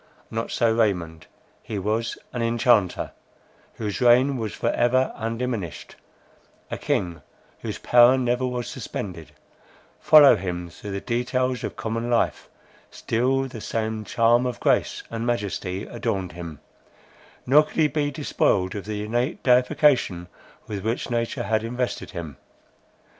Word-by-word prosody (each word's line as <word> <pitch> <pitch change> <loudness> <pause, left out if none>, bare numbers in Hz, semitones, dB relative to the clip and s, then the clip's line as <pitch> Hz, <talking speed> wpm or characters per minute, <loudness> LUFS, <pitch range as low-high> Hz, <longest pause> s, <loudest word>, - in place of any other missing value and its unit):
Not 115 +1 -3
so 115 -2 +2
Raymond; 85 -8 -1 0.3
he 110 - -5
was 110 +4 -1 0.2
an 120 - -2
enchanter, 115 -4 +2 0.6
whose 105 -1 -4
reign 125 +3 +5
was 110 -4 -3
for 115 - -1
ever 130 +2 +2
undiminished; 115 -6 -4 0.8
a - - -2
king 85 -3 -1 0.4
whose - - -5
power 125 +2 +6
never 125 0 0
was 125 -1 -3
suspended: 95 - -6 0.7
follow 150 -3 +8
him 90 -2 -5
through 100 +5 -8
the 100 - -3
details 125 +1 -1
of - - -4
common 115 +1 -3
life, 120 -1 0 0.4
still 130 +4 0
the 130 -4 -7
same 110 0 -2
charm 120 +4 +3
of 125 - -4
grace - - +1
and 115 0 -3
majesty 100 -4 -2
adorned 100 -6 -3
him; 85 -4 -8 0.8
nor 145 +4 +6
could 155 - -8
he 155 -2 +5
be 150 -1 -1
despoiled 115 -10 0
of 100 -2 -6
the 105 -1 -4
innate 120 - -1
deification 125 - +3 0.4
with 100 -3 -5
which 115 +3 -2
nature 115 -1 -1
had 110 +2 0
invested 125 +2 -3
him. 80 -7 -7
115 Hz, 135 wpm, -24 LUFS, 100-125 Hz, 0.8 s, follow